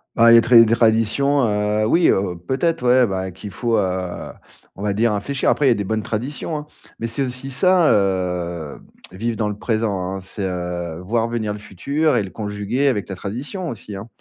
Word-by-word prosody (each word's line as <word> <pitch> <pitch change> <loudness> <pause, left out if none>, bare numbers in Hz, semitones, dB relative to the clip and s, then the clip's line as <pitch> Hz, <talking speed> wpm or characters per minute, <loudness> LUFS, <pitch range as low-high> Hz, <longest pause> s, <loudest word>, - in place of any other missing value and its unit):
Bah, 115 0 +6
il 115 - +9
y - - +9
a - - +7
très 120 0 +7
des 115 - 0
traditions, 115 +6 +2
heu, 105 +1 0
oui, 170 +7 +4
heu, 95 -2 +1
peut-être, 135 -1 0
ouais, 125 0 +5
bah, 95 -1 -3
qu'il 95 +3 -9
faut, 115 +3 -1
heu, 95 -2 -3 0.4
on 100 - -8
va 105 -1 0
dire, 115 +2 +2
infléchir. 135 +7 -1
Après, 145 - +2
il - - +6
y - - +5
a - - +6
des 100 - -2
bonnes 110 +1 -1
traditions, 130 +9 -4
hein. 150 0 -5 0.3
Mais 115 - -2
c'est 120 +4 -2
aussi 130 +1 -5
ça, 175 +5 +4
heu, 90 -5 -1 0.3
vivre 115 +4 -3
dans 105 -2 0
le 105 - -5
présent, 110 -3 -1
hein: 95 - -4
c'est, 95 +2 -6
heu, 90 -2 -4
voir 115 +5 0
venir 115 -3 -2
le 105 - -5
futur 140 - -1
et - - +3
le 95 - -5
conjuguer 105 +6 -2
avec 105 -6 -2
la 95 - -4
tradition 135 - -5
aussi, 105 -4 -7
hein. 100 +3 -7
110 Hz, 220 wpm, -21 LUFS, 95-125 Hz, 0.4 s, il